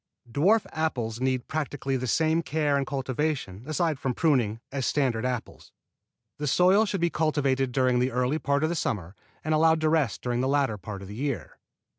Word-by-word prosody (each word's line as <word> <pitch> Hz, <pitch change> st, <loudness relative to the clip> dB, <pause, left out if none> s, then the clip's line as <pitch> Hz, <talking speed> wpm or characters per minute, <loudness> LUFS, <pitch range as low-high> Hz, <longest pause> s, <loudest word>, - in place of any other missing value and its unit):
Dwarf 185 Hz, -, +3 dB
apples 125 Hz, -8 st, -2 dB
need 130 Hz, -1 st, 0 dB
practically 145 Hz, -3 st, -2 dB
the 130 Hz, 0 st, -2 dB
same 160 Hz, +5 st, +2 dB
care 150 Hz, -2 st, 0 dB
and 140 Hz, -1 st, 0 dB
cultivation, 135 Hz, -6 st, -2 dB
aside 155 Hz, -1 st, 0 dB
from 130 Hz, -3 st, -2 dB
pruning, 120 Hz, -9 st, +2 dB
as 135 Hz, -2 st, -2 dB
standard 125 Hz, -5 st, +1 dB
apples. 125 Hz, -2 st, -6 dB, 0.7 s
The 150 Hz, -, -2 dB
soil 185 Hz, +9 st, +4 dB
should 195 Hz, -2 st, -2 dB
be 170 Hz, 0 st, +2 dB
cultivated 140 Hz, -4 st, +1 dB
during 125 Hz, -1 st, +2 dB
the 125 Hz, +1 st, +2 dB
early 125 Hz, +5 st, 0 dB
part 140 Hz, +1 st, 0 dB
of 155 Hz, -, +2 dB
the 170 Hz, -, -1 dB
summer 100 Hz, -, -3 dB, 0.3 s
and 155 Hz, -, 0 dB
allowed 160 Hz, +1 st, +4 dB
to 155 Hz, -, +2 dB
rest 155 Hz, -7 st, +1 dB
during 120 Hz, 0 st, 0 dB
the 130 Hz, -, 0 dB
latter 135 Hz, -6 st, +1 dB
part 100 Hz, +1 st, -7 dB
of -, -, -9 dB
the 100 Hz, -, -8 dB
year. 135 Hz, +3 st, -4 dB
140 Hz, 190 wpm, -27 LUFS, 125-155 Hz, 0.7 s, soil